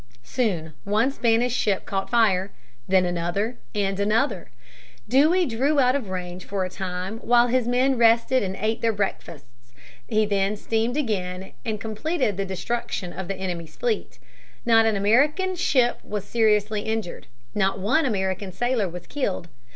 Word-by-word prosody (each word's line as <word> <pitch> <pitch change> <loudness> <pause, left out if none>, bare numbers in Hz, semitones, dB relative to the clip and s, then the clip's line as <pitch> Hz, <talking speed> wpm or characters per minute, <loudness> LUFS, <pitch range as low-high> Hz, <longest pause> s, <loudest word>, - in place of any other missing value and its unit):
Soon 175 - -2
one 215 +6 +2
Spanish 240 -1 +1
ship 200 -5 0
caught 195 -1 -3
fire, 205 -5 +3 0.4
then 185 -1 +4
another, 175 +7 -2 0.2
and 195 -1 0
another. 215 +7 0 0.6
Dewey 310 - +4
drew 270 +4 +1
off 270 - +5
out 255 - +2
of 250 -9 -3
range 180 -1 -5
for 195 -2 -2
a 185 - -6
time 185 +3 -4
while 240 0 +4
his 250 -1 +1
men 255 +1 +2
rested 230 +2 +4
and 190 -1 -3
ate 220 +3 -1
their 230 - +3
breakfasts. 125 - -5 0.3
He 215 -2 +2
then 200 0 0
steamed 225 +5 -1
in 300 - +2
again 185 -5 -3
and 220 -3 -3
completed 225 - -1
the 195 +1 -2
destruction 190 -1 -3
of 190 0 -6
the 195 - -2
enemy's 175 -3 -5
fleet. 475 -3 -2 0.5
Not 225 -1 +5
an 220 - +2
American 290 - +2
ship 255 -8 +2
was 210 -2 -4
seriously 215 -2 +2
injured. 220 -4 -4 0.3
Not 195 -1 +1
one 230 +12 +2
American 190 -3 -2
sailor 240 -1 0
was 175 +1 -8
killed. 195 -11 -3
215 Hz, 160 wpm, -24 LUFS, 190-240 Hz, 0.6 s, off